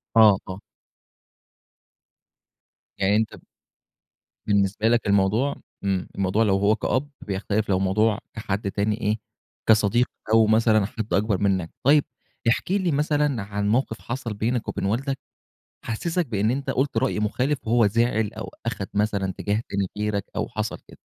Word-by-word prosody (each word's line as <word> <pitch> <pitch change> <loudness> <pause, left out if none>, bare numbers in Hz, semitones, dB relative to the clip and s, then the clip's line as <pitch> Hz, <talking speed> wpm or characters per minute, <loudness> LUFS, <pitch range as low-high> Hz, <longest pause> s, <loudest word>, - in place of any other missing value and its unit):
آه، 105 -4 +7
آه. 95 +1 -5 2.4
يعني 100 +2 +2
أنت 110 0 0
ب - - -16 1.1
بالنسبة 100 +1 +2
لك 115 -2 +2
الموضوع 100 +8 +2 0.3
امم، 95 -2 0
الموضوع 100 +3 +1
لو 95 -2 +3
هو 100 +2 +3
كأب 135 +5 -1
بيختلف 100 +1 -2
لو 95 -1 +2
موضوع 105 +3 +2
كحد 100 -2 -3
تاني 105 +3 -1
إيه، 105 +1 +1 0.5
كصديق 110 +3 +4 0.3
أو 110 -1 +6
مثلًا 110 -2 +4
حد 110 -2 -5
أكبر 100 0 +2
منّك، 95 -5 0
طيّب 145 +2 +5 0.5
احكِ 145 - 0
لي 190 -4 +1
مثلًا 145 -4 +1
عن 100 0 -2
موقف 115 -1 0
حصل 120 -3 -4
بينك 115 +3 -1
وبين - - -3
والدك، 135 +6 -1 0.7
حسِّسك 165 +10 -1
بأن 110 0 +1
أنت 135 +1 -3
قُلت 140 +2 0
رأي 130 -5 +1
مخالف، 130 +6 -1
وهو 115 -1 +4
زعل 110 0 +1
أو 110 - -5 0.2
أخد 110 -4 -3
مثلًا 100 -2 0
اتجاه 105 +3 -1
تاني 100 -1 -1
غيرك 105 -2 -1
أو - - -1
حصل - - -3
كده. - - -15
110 Hz, 150 wpm, -24 LUFS, 100-120 Hz, 2.4 s, آه